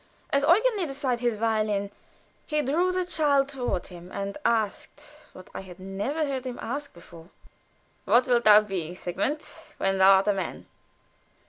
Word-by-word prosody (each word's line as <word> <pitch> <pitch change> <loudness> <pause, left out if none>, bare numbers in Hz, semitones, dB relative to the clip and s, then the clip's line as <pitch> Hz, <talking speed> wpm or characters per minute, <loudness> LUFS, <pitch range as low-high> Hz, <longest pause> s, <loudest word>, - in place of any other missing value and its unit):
As 280 - +3
Eugen 415 - +4
laid 350 -6 -2
aside 270 -3 -2
his 240 -3 0
violin, 215 -2 0 0.6
he 300 -1 0
drew 340 +7 +1
the 365 0 -1
child 290 -5 +2
toward 250 -9 -3
him, 175 0 -12
and 200 0 -4
asked 220 -3 -1 0.3
(what - - -14
I - - -5
had 185 -2 -12
never 205 +12 -2
heard 265 -2 -4
him 245 - -5
ask 280 +4 -5
before): 170 0 -15 0.8
"What 245 +1 +4
wilt 240 -1 +2
thou 210 0 +8
be, 180 -5 -4
Sigmund, 195 - -2 0.4
when 195 0 0
thou 190 +1 +8
art 190 +1 +3
a 205 - +4
man?" 190 -3 -5
235 Hz, 165 wpm, -26 LUFS, 195-280 Hz, 0.8 s, thou